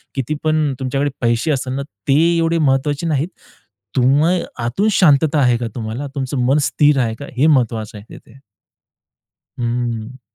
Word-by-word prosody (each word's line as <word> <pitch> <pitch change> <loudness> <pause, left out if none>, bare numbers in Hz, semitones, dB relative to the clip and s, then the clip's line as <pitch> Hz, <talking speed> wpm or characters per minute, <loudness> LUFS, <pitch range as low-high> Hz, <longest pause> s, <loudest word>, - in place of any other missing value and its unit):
किती 135 +2 -2
पण 155 -2 +1
तुमच्याकडे 135 +2 -1
पैसे 120 +4 +1
असेल 130 -2 -2
ना 135 - -2 0.3
ते 135 - +4 0.2
एवढे 165 0 +1
महत्त्वाचे 145 +2 +1
नाहीत. 150 0 0 0.7
तुम्ह 135 +6 +3 0.4
आतून 190 - 0
शांतता 155 -4 +3
आहे 125 -3 +3
का 120 0 -3
तुम्हाला, 115 +4 -4
तुमचं 135 0 -3
मन 135 +4 +3
स्थिर 145 -2 +3
आहे 115 -3 0
का 140 - -7
हे 145 +5 +4
महत्त्वाचं 115 -7 0
आहे 105 - -13
तिथे. 125 +4 -17 1.2
हम्म. 120 0 -3
135 Hz, 150 wpm, -18 LUFS, 120-150 Hz, 1.2 s, ते